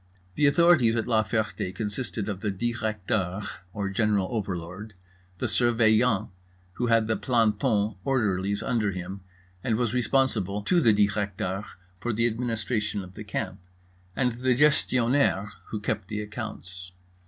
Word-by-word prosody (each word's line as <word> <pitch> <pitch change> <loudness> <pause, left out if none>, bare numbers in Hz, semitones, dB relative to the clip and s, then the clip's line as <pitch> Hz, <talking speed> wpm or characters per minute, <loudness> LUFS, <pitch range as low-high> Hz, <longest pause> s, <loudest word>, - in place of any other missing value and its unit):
The 150 - +3
authorities 140 -7 +5
at 110 - 0
La 110 -2 +3
Ferté 105 -4 -2
consisted 110 +1 -3
of 100 -3 -3
the 105 - -2
Directeur, 105 -3 -1 0.3
or 100 +1 -3
general 100 -2 +1
overlord, 95 -1 -4 0.4
the - - -2
Surveillant, 115 -2 +3 0.4
who 120 - -1
had 115 -1 +4
the 110 0 0
plantons 110 -1 +1
(orderlies) 100 -6 0
under 115 -5 +1
him 95 +2 -6 0.4
and 115 -3 +1
was 120 -1 0
responsible 115 -5 +1
to 175 - +3
the 115 - +5
Directeur 100 -2 0 0.4
for 120 +4 -2
the 115 +2 +1
administration 110 -3 -1
of 90 0 -12
the 105 - -8
camp, 95 -2 -4 0.6
and 125 -2 +2
the 125 +2 +1
Gestionnaire 130 -6 +2 0.2
(who 110 - -3
kept 105 -2 -2
the 105 0 -3
accounts). 90 -4 -8
110 Hz, 140 wpm, -27 LUFS, 100-120 Hz, 0.6 s, authorities